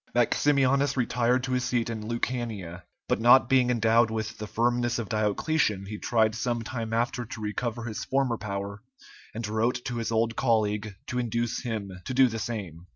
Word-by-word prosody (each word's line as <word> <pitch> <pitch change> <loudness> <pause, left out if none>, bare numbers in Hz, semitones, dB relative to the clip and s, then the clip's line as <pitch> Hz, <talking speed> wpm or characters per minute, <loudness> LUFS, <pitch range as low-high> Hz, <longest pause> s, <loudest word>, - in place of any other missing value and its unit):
Maximianus 140 +2 +3
retired 125 0 +1
to 130 - -3
his 125 0 +1
seat 120 -2 0
in 115 -2 -4
Lucania, 115 -7 -3 0.3
but - - +1
not 120 +2 +7
being 130 -2 +4
endowed 115 -1 +3
with 110 0 -4
the 105 - -5
firmness 120 +1 +1
of 115 -4 -4
Diocletian 110 0 0
he 105 +1 -6
tried 110 -2 +2
some 120 +1 -2
time 115 -1 -4
after 120 +2 0
to 110 0 -8
recover 115 +2 -3
his 110 -2 -4
former 135 -4 0
power, 100 -1 -5 0.5
and 115 -1 -3
wrote 115 +3 0
to 120 - -3
his 115 0 -2
old 115 0 +1
colleague 105 -4 0
to 125 - -2
induce 120 -1 -1
him 110 -5 -4
to 130 - -4
do 130 0 +6
the 115 -2 -4
same. 100 -7 -5
115 Hz, 180 wpm, -27 LUFS, 110-125 Hz, 0.5 s, not